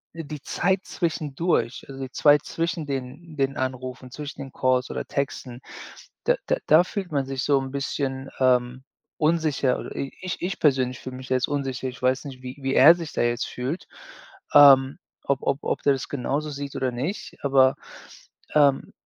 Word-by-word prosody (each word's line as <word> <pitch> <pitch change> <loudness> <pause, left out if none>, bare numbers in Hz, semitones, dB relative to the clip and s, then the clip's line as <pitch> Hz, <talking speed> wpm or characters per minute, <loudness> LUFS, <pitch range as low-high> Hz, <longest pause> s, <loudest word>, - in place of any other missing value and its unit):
die 150 -3 -7
Zeit 190 +5 0
zwischendurch 155 -5 -1
also, 135 0 -8
die 130 - -7
Zeit 145 +1 +4
zwischen 165 -1 -2
den 140 +4 -6
den 135 0 0
Anrufen, 130 0 -4
zwischen 145 +2 -7
den 135 - -8
Calls 130 0 +1
oder - - -4
Texten, 130 -3 -4 0.6
da - - +4
da - - +2
da 160 +3 +7
fühlt 190 -2 -5
man 140 -3 0
sich 135 -1 -3
so 140 -2 +3
'n 135 0 -5
bisschen, 135 -1 -3
ähm, 125 0 +2 0.3
unsicher 155 -5 +1
oder - - -8
i 135 - -4
ich 185 -2 -4
ich 185 +3 -3
persönlich 130 -4 +2
fühle 130 0 -8
mich 130 0 -10
da 130 - +2
jetzt 130 - +1
unsicher. 135 -3 -2
Ich 125 - -12
weiß 130 +3 +1
nicht, 130 -2 -9
wie 125 +2 -7
wie 135 0 -1
er 155 +5 +9
sich 165 -3 -7
da - - -1
jetzt 120 0 0
fühlt. 130 +8 -4 0.7
Ähm, 135 -2 +7 0.3
ob 140 -1 0
ob 140 +1 0
ob - - -1
der 140 - +4
das 135 - -5
genauso 145 +3 -2
sieht 140 -1 -6
oder 130 -1 -1
nicht, 135 - -5
aber, 135 -1 +4 0.8
ähm, 140 -2 +3
135 Hz, 180 wpm, -25 LUFS, 130-150 Hz, 0.8 s, er